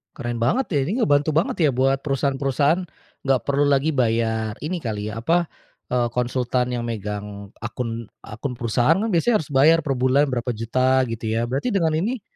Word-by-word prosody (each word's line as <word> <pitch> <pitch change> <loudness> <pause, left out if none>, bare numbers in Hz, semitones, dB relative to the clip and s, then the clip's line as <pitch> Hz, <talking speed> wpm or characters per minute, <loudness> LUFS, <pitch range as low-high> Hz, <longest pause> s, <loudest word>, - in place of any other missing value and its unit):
Keren 120 -3 -4
banget 170 - +1
ya, 150 - 0
ini 220 - -1
ngebantu 145 -4 +2
banget 165 +3 +1
ya, - - +4
buat 135 +2 +2
perusahaan-perusahaan, 140 +4 +1 0.4
nggak 135 -2 +3
perlu 140 +1 +2
lagi 145 +2 +2
bayar 115 -4 0
ini 175 +5 -2
kali 110 -7 -4
ya, 115 - -6
apa 165 +8 +1 0.4
eee, 125 -1 +1
konsultan 125 0 0
yang 120 -1 -3
megang 105 -2 -5
akun 115 0 -5 0.2
akun 125 +5 -6
perusahaan 120 +5 +2
kan 225 - -1
biasanya 205 +3 +2
harus 150 - -11
bayar 155 +5 +5
per 135 -3 -2
bulan 130 +3 +3
berapa 125 -1 -2
juta, 130 +4 +1
gitu 110 -1 -3
ya. 115 +1 -1
Berarti 140 - -1
dengan 160 -5 +1
ini, 225 +7 -2
130 Hz, 180 wpm, -22 LUFS, 115-150 Hz, 0.4 s, bayar